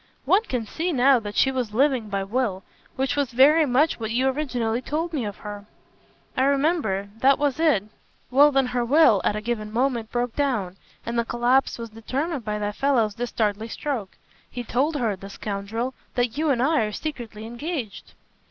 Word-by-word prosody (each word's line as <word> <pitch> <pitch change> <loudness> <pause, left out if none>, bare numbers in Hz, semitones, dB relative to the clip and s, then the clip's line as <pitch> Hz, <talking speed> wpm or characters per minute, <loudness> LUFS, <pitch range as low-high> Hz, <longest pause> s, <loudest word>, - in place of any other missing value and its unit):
"One 390 - +4
can 245 - -2
see 330 - -2
now 265 -2 +4
that 205 -2 -7
she 265 - +3
was 245 -5 -3
living 260 -4 +2
by 195 -1 -1
will 200 -2 -1 0.3
which 265 +1 0
was 285 -3 0
very 295 +5 +6
much 275 +5 +2
what 220 -1 -3
you 250 +4 +1
originally 250 -5 -1
told 325 +6 -3
me 265 -7 -1
of 205 -1 -5
her." 205 0 -7 0.7
"I - - +1
remember. 275 - +1
That 270 +2 +5
was 290 0 0
it." 305 -12 +3 0.5
"Well 290 +3 +6
then 270 -1 +3
her 245 -1 -1
will, 245 -5 +5
at 210 - +1
a 210 - -3
given 215 -2 -3
moment, 235 -1 0
broke 240 -1 -2
down, 220 -11 -1 0.3
and 235 0 -1
the - - +2
collapse 240 +3 +1
was 230 -2 -7
determined 265 +6 -3
by 210 -1 -2
that 210 0 -3
fellow's 245 -7 +2
dastardly 220 -2 -2
stroke. 230 -5 -4 0.3
He 245 - -5
told 275 +7 0
her, 230 -7 0
the 195 +1 -10
scoundrel, 210 +5 -4 0.2
that 245 -2 0
you 310 +1 0
and 250 -3 +2
I 310 +1 +3
are 210 - -4
secretly 230 -5 -6
engaged." 240 - -5
245 Hz, 190 wpm, -24 LUFS, 215-275 Hz, 0.7 s, very